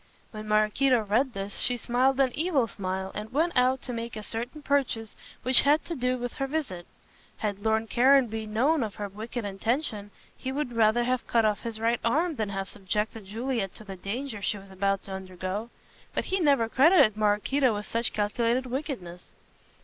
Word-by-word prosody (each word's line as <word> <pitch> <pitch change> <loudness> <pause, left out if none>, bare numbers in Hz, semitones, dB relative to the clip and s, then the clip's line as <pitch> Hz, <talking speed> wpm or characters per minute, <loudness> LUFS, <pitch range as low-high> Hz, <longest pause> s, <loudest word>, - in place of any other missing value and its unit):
When 215 -1 -7
Maraquito 215 +4 +3
read 235 +6 +1
this 195 0 -5
she 245 - 0
smiled 255 +3 +1
an 265 -2 +4
evil 310 -6 +1
smile 190 -2 -4
and 210 +2 -6
went 320 +6 +1
out 255 +1 +3
to 250 - -4
make 230 0 -5
a 215 - -6
certain 240 +8 -5
purchase 255 -7 0 0.3
which 255 +1 +6
had 295 +2 +3
to 340 - -3
do 250 -1 0
with 245 -1 -4
her 270 - -1
visit. 265 - -3 0.5
Had 205 -2 -3
Lord 220 0 +1
Caranby 240 -3 +3
known 265 +9 +2
of 215 -4 -3
her 205 - -4
wicked 220 +3 -6
intention 210 +1 -2 0.3
he 260 - -5
would 270 -3 -3
rather 230 +1 +3
have 255 +1 -1
cut 230 -2 +3
off 210 -1 +1
his 230 -2 -5
right 230 +1 +1
arm 315 +9 +2
than 215 -2 -1
have 195 -1 -3
subjected 210 +2 -3
Juliet 225 -1 -3
to - - -10
the 195 -2 -8
danger 215 +4 -5
she 205 +2 -1
was 195 -1 -13
about 195 +1 0
to 195 - -10
undergo. 190 +3 -5 0.5
But - - 0
he 380 - 0
never 280 -8 +3
credited 275 - +5
Maraquito 215 +4 +2
with 205 0 -4
such 230 0 0
calculated 230 +4 0
wickedness. 245 - -5
230 Hz, 190 wpm, -27 LUFS, 205-260 Hz, 0.5 s, which